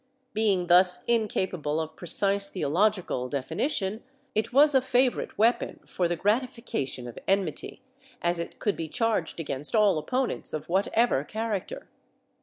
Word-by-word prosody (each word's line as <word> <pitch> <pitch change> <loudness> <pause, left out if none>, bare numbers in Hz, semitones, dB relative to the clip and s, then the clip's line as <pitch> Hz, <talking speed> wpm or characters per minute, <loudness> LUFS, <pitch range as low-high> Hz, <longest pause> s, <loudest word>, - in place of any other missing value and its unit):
Being 205 -4 +2
thus 180 +1 +4
incapable 185 -9 -1
of 160 0 -5
precise 200 +4 +3
theological 180 -5 0
definition, 195 - -1 0.3
it 215 - -1
was 290 +3 +5
a 265 - +5
favorite 255 0 0
w^eapon 230 +4 0
for 180 - -1
the 175 - -1
gratification 215 - -2
of 120 - -9
enmity, 195 -5 -1 0.4
as 170 0 0
it 170 - -6
could 205 - -1
be 165 - -4
charged 215 -2 -1
against 150 - -3
all 205 -6 +4
opponents 255 - -2
of 155 0 -5
whatever 195 - +2
character. 220 - -4
195 Hz, 135 wpm, -27 LUFS, 165-225 Hz, 0.4 s, was